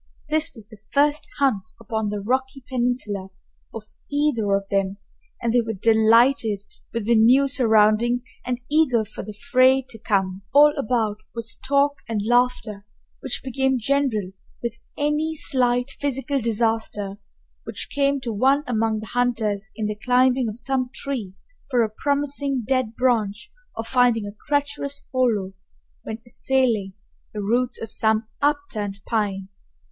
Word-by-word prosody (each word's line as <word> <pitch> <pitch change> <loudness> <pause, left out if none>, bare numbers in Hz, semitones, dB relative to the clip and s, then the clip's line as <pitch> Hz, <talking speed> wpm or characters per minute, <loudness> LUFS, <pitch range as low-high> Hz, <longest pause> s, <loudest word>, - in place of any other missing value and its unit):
This 310 0 +2
was 220 -3 -11
the 215 -3 -15
first 290 +1 +2
hunt 225 -8 0
upon 220 -1 -2
the 205 0 -3
rocky 260 +4 -1
peninsula 240 -6 -1 0.4
of 225 - -7 0.3
either 270 -9 +1
of 195 0 -2
them, 195 0 0 0.4
and 230 -1 -1
they 245 - +4
were 225 -1 -3
delighted 220 +1 +3 0.3
with 230 -3 -3
the 235 - +3
new 245 +5 +5
surroundings 235 -1 +3 0.2
and 245 -1 -2
eager 280 -8 +3
for 210 - -8
the 210 0 -9
fray 260 +1 +5
to 225 - -8
come. 195 -3 0
All 295 +1 +8
about 225 -6 0 0.2
was 230 -1 -3
talk 280 +1 +1
and 220 -2 -1
laughter, 240 -3 +1 0.4
which 265 - -2
became 265 0 +1
general 240 -6 0 0.3
with 235 -1 -4
any 300 +2 0
slight 250 -3 +1
physical 280 0 -1
disaster 220 -3 -1 0.5
which - - -5
came 280 0 +2
to 235 -3 -3
one 270 +7 +3
among 225 -3 0
the - - -7
hunters 225 -4 0
in 220 -1 -3
the 210 - -1
climbing 250 +2 +2
of 215 - -7
some 255 0 -1
tree 240 -11 -4 0.3
for 245 -4 +3
a 220 - -1
promising 280 +1 0
dead 255 -4 0
branch 230 -4 0 0.2
or 225 - -3
finding 240 -2 +2
a 205 - -7
treacherous 285 -1 -1
hollow 220 -7 +1 0.5
when 220 - -6
assailing 240 -5 0 0.4
the 210 - -2
roots 245 +4 +1
of 225 -1 -7
some 220 0 +1
upturned 280 -9 -1
pine. 195 -4 -1
235 Hz, 145 wpm, -23 LUFS, 215-265 Hz, 0.5 s, All